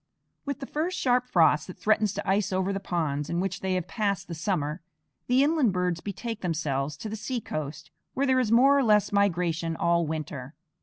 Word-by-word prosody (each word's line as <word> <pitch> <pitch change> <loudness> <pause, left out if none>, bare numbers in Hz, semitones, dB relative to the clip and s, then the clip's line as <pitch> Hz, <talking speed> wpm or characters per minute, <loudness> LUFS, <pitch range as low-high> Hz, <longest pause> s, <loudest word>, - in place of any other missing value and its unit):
With 280 0 -4
the - - -3
first 320 +6 -2
sharp 250 -1 +2
frost 160 -8 +3
that 185 - -9
threatens 215 -1 +2
to 205 - -4
ice 195 +1 +1
over 190 +1 0
the 195 - -2
ponds 155 -6 -2
in 170 0 -1
which 190 0 -2
they 190 -1 -1
have 180 -1 -2
passed 200 -2 -1
the 170 - -6
summer, 165 -2 -2 0.5
the 255 +2 +4
inland 290 - +2
birds 180 -2 -1
betake 215 +3 -5
themselves 150 -5 -2
to 220 - -6
the 215 - -4
seacoast, 210 - -5 0.2
where 275 - +1
there 260 -1 +3
is 235 -4 0
more 265 +4 +6
or 280 - +3
less 210 -3 +3
migration 170 -5 +1
all 170 0 +1
winter. 150 -3 -5
190 Hz, 200 wpm, -27 LUFS, 165-225 Hz, 0.5 s, more